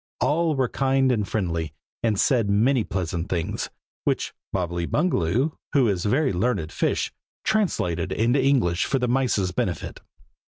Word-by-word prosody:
All 160 +1 +2
were 130 -2 +1
kind 135 0 +2
and 105 -5 0
friendly, 85 -6 -2 0.3
and 110 -4 +1
said 115 -6 +3
many 115 +5 +3
pleasant 90 -3 -3
things, 85 -3 -2 0.3
which - - -1 0.2
Bobbily 85 -2 -2
Bungaloo, 125 - +1 0.2
who 135 -4 +4
is 95 -2 0
a - - +2
very 135 +1 +2
learned 95 -4 0
fish, - - 0 0.3
translated 95 - 0
into 120 +6 +2
English 115 -12 +2
for 135 - +1
the 125 -1 0
mice's 120 -7 +1
benefit. - - -3
110 Hz, 150 wpm, -24 LUFS, 90-135 Hz, 0.3 s, who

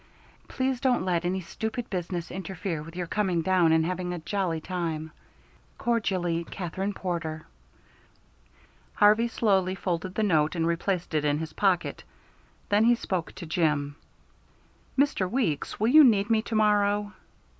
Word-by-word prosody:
Please 260 -1 -1
don't 250 -7 +2
let 175 -2 0
any 185 +1 -1
stupid 220 +6 -4
business 175 -2 -3
interfere 190 -3 -4
with 165 +2 -11
your 180 -1 -3
coming 180 -2 0
down 180 -2 +3
and 160 0 +3
having 180 0 -2
a 175 - -3
jolly 170 -1 -2
time. 160 -2 -4 0.7
Cordially, 185 -8 0
KATHERINE 190 +3 -4
PORTER. 165 -4 -4 1.5
Harvey 215 +3 +5
slowly 195 -5 +1
folded 185 0 -3
the 220 - +1
note 155 -5 +2
and 165 -1 0
replaced 170 +1 -1
it 155 -1 +1
in 145 0 +1
his 160 0 -5
pocket. 190 -4 0 0.7
Then 205 +2 +4
he 240 +1 +5
spoke 185 -7 -3
to 170 - -7
Jim. 150 -3 0 1.0
"Mr. 260 -9 +2
Weeks, 205 - -1
will 220 +2 +2
you 305 +4 +9
need 215 -4 +4
me 220 -1 +4
to 225 - -5
morrow?" 205 -1 +2
185 Hz, 145 wpm, -27 LUFS, 165-210 Hz, 1.5 s, you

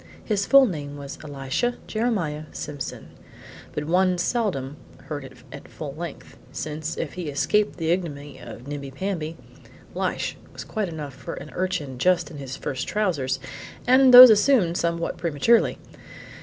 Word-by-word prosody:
His 200 -3 0
full 275 -1 +8
name 145 - -5
was 140 -1 -8
Elisha 145 - -2
Jeremiah 190 -10 -1
Simpson, 145 -3 -6 0.6
but 150 - -3
one 180 +3 +2
seldom 175 - -1 0.3
heard 145 -2 -5
it 135 0 -11 0.2
at 140 - -10
full 145 -3 -7
length, 165 +1 -8
since, 155 +3 -4
if 150 - -4
he 175 -4 -5
escaped 175 +9 +1
the 165 -1 0
ignominy 145 -6 -3
of 120 - -10
Nimbi 140 -1 -6
Pamby, 165 +1 -4 0.6
Lishe - - -2 0.2
was - - -7
quite 215 -4 -3
enough 150 -4 -6
for - - -7
an 150 - -9
urchin 170 -9 -3
just 180 +2 +2
in 150 - -9
his 135 -2 -6
first 130 -1 -4
trousers 145 -11 0 0.5
and 260 +1 +6
those 250 -1 +12
assumed 210 -5 +4
somewhat 170 -1 -1
prematurely. 170 +7 +2
160 Hz, 150 wpm, -24 LUFS, 145-195 Hz, 0.6 s, those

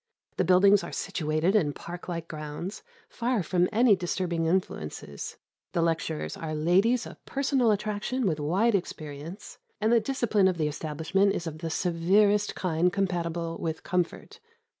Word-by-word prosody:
The - - +3
buildings 190 +3 +5
are - - -6
situated 165 0 0
in 150 -9 +2
park 175 +3 -8
like 170 -2 -4
grounds, 155 +5 -6 0.3
far 235 -4 -1
from 180 +2 +1
any 225 -1 +5
disturbing 175 -2 -1
influences. 75 - -3 0.4
The 170 - +2
lecturers 165 -1 -1
are 155 -1 -4
ladies 190 +10 +3
of - - -11
personal 270 -3 +1
attraction 215 +4 -1
with 160 -5 0
wide 190 +11 +2
experience, 160 0 -5 0.2
and 215 +2 +2
the 235 - +6
discipline 220 -5 +2
of 185 -2 0
the 155 -2 +1
establishment 160 +7 0
is 170 - -3
of 155 -1 -6
the 165 0 -3
severest 200 +5 +2
kind 180 0 +1
compatible 170 -3 -2
with 160 -1 -3
comfort. 180 -1 -2
180 Hz, 150 wpm, -28 LUFS, 165-205 Hz, 0.4 s, the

